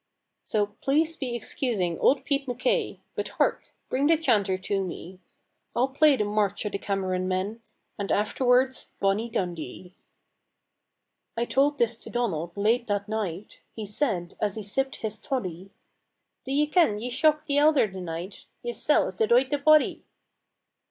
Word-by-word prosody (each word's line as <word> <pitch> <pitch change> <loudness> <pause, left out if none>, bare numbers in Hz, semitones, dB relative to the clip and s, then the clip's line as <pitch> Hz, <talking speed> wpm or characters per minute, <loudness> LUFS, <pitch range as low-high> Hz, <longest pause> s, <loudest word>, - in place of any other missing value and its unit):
"So 210 -2 +1
please 285 +10 0
be 250 -3 -4
excusing 220 - -1
old 270 0 +3
Pete 280 -2 0
MacKay 480 - 0
But - - -3
hark! - - 0 0.2
bring 275 +3 +1
the 325 0 +5
chanter 205 -11 +2
to 195 +1 -1
me, 180 0 -8 0.6
I'll 255 +3 +2
play 290 +2 +5
the 210 - 0
'March 205 0 0
o' - - 0
the 200 - -4
Cameron 185 -2 -1
Men,' 190 +5 -2 0.4
And 200 - -2
afterward 250 +5 +3 0.3
'Bonnie 200 +4 +1
Dundee.'" 175 - -4 1.4
I 235 - +1
told 280 +4 +2
this 235 -2 +1
to - - -8
Donald 175 -8 -2
late 230 +4 +2
that 205 -1 -1
night; 210 -3 -4 0.2
He 220 - -5
said, 205 -5 -1
as 205 -2 0
he 215 - -5
sipped 265 +7 -1
his 220 -1 -5
toddy, 190 -9 -4 0.8
"Do 265 - -5
ye 290 +2 +3
ken 300 - +3
ye 245 +3 -4
shocked 305 +3 +2
the 290 -2 +2
elder 295 -4 +5
the 190 -2 -7
night? 175 +3 -6 0.2
Yersel' 480 0 +2
is - - -7
the 445 - +2
doited 450 - +3
body. 310 0 +4
220 Hz, 160 wpm, -26 LUFS, 195-275 Hz, 1.4 s, the